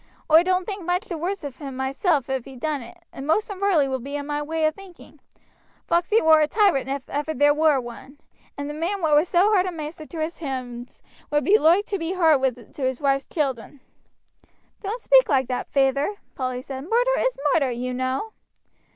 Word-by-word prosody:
Oi 320 +1 +8
don't 365 0 0
think 400 -3 -5
much 355 +5 -1
the 345 -6 -5
worst 380 +3 -3
of 280 -3 -7
him 275 -3 -7
myself 275 +2 0
if 265 -3 -3
he 270 - -11
done 290 +2 -2
it, 235 +9 -12 0.2
and 270 - -7
most 420 +7 +1
in 385 - -7
Varley 370 -8 +3
will 265 -1 -2
be 280 +4 -5
o' 285 - -4
my 295 0 -3
way 315 +1 -1
o' 310 - +3
thinking. 370 +1 -15 0.7
Foxey 350 +6 +2
war 315 -1 +6
a 305 - +3
tyrant 355 - +2
if 275 -1 -4
ever 295 +2 -3
there 290 +2 +4
war 305 -2 +3
one, 240 +3 -10 0.4
and 285 0 -4
the 295 - -5
man 345 +5 -3
what 305 -2 +4
was 310 +5 +3
so 380 +4 +4
hard 375 -2 +3
a - - -2
maister 310 -1 -7
to 330 - -8
his 315 +2 -3
hands 255 -5 -6 0.3
would 295 0 +1
be 420 +3 +4
loike 345 +6 +4
to 400 - -3
be 330 +2 -2
hard 270 - +1
to - - -10
his 260 -1 -1
wife's 275 -1 +1
children." 275 -3 -3 1.0
"Don't 440 +4 -5
speak - - +5
like 265 -4 +2
that, 250 - -3
feyther," 275 +7 +1 0.2
Polly 255 -1 -3
said; 265 -1 -7
"murder - - +2
is - - 0 0.2
murder, 285 -6 +2
you 250 +1 -3
know." 260 - -2
300 Hz, 210 wpm, -23 LUFS, 270-360 Hz, 1.0 s, Oi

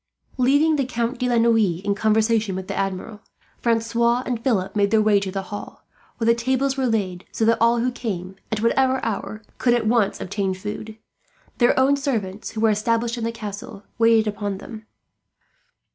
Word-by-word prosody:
Leaving 285 +5 +4
the 275 - +1
Count 240 0 -2
de 250 -1 0
la 240 - +2
Noue 225 -7 +3
in 200 - +2
conversation 220 -1 +1
with 190 0 -5
the - - -3
Admiral, 195 +2 -3 0.4
Francois 235 +1 +1
and 235 -2 -3
Philip 215 -8 0
made 200 -1 +2
their 220 +1 +3
way 210 -1 +4
to 195 -1 -4
the 195 0 -3
hall; 205 - -8 0.3
where 225 - -2
the 230 - +5
tables 260 +3 0
were 265 -2 0
laid, 190 -6 -1
so 220 - 0
that 230 +1 +3
all 235 +1 +4
who 245 +2 0
came, 190 -7 -5 0.2
at 220 0 -1
whatever 260 +2 +2
hour, 215 0 -4 0.2
could 240 -1 +3
at 235 -2 -1
once 220 -3 +2
obtain 195 0 -2
food. 210 +3 -7 0.6
Their 240 +1 +4
own 270 +2 +4
servants, 220 -8 -3
who 220 - -5
were 225 -1 +4
established 230 +3 0
in - - -4
the 230 - -1
castle, 210 -2 -8 0.2
waited 225 -1 +5
upon 205 -2 -3
them. 220 +1 -10
225 Hz, 190 wpm, -22 LUFS, 205-240 Hz, 0.6 s, the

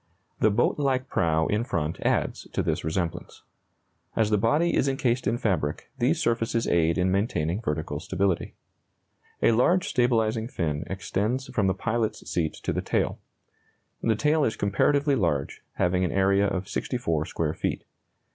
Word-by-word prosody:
The 110 - +4
boat 120 +7 +1
like 130 -2 +1
prow 80 -1 +1
in 105 +6 0
front 80 -9 -2
adds - - 0
to - - 0
this - - -1
resemblance. 85 +1 -3 0.7
As 110 -1 +2
the 105 - +4
body 150 +11 +2
is 140 - +2
encased 130 -4 0
in 115 +3 +1
fabric, 90 - -1
these 140 +7 +2
surfaces 115 -3 0
aid 85 0 +2
in 90 0 +2
maintaining 95 -2 0
vertical 75 -6 -3
stability. 95 +1 -1 0.9
A - - +6
large 170 +11 +3
stabilizing 115 -3 +1
fin 75 - -2
extends 100 +8 -2
from 100 -3 +1
the 95 - +1
pilot's 115 -1 -2
seat 80 -3 -1
to - - -1
the - - -1
tail. - - -1 0.8
The 115 -1 +2
tail 150 +6 +2
is 110 - +1
comparatively 140 +9 +2
large, 85 - -1
having 90 +1 +1
an 90 - 0
area 100 +1 +3
of 95 -1 -2
64 85 - -1
square 80 -2 -2
feet. - - -3
105 Hz, 155 wpm, -26 LUFS, 85-120 Hz, 0.9 s, A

